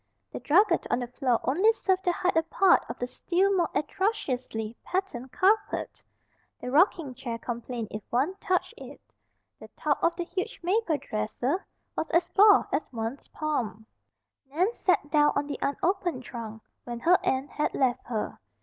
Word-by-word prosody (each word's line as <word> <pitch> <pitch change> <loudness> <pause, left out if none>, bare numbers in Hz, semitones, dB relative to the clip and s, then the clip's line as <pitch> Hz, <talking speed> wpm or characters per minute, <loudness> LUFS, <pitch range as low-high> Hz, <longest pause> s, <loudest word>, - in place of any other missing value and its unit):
The - - -5
drugget 395 +8 +3
on - - +2
the 245 - -2
floor 250 -1 0
only 370 +12 +4
served 380 -3 0
to 355 - +4
hide 360 0 0
a 325 - +5
part 355 +3 +3
of 235 - -5
the 245 - -2
still 375 +9 +1
more 345 -3 +2
atrociously 255 - -2
patterned 315 -10 -3
carpet. 415 +7 +1 0.6
The 250 - -5
rocking 315 -2 +3
chair 235 -1 -5
complained 235 -1 -5
if 210 - -5
one 270 +10 +1
touched 370 -2 -1
it. - - -10 0.6
The - - -11
top 295 -2 0
of 335 - +3
the 350 - -2
huge 370 +2 -4
maple 365 -3 +1
dresser 245 - -2 0.3
was - - -2
as 340 +1 +2
bald 410 +1 +6
as - - -1
one's 230 +3 -5
palm. 235 -9 -3 0.6
Nan 360 +11 +1
sat 330 -9 +1
down 295 -1 +4
on 285 - 0
the 285 -1 -5
unopened 345 -1 -1
trunk 225 -3 -8 0.2
when 240 -1 -6
her 360 +6 +5
aunt 270 -6 0
had 300 - -1
left 255 -2 0
her. 225 -3 -3
295 Hz, 170 wpm, -27 LUFS, 245-370 Hz, 0.6 s, bald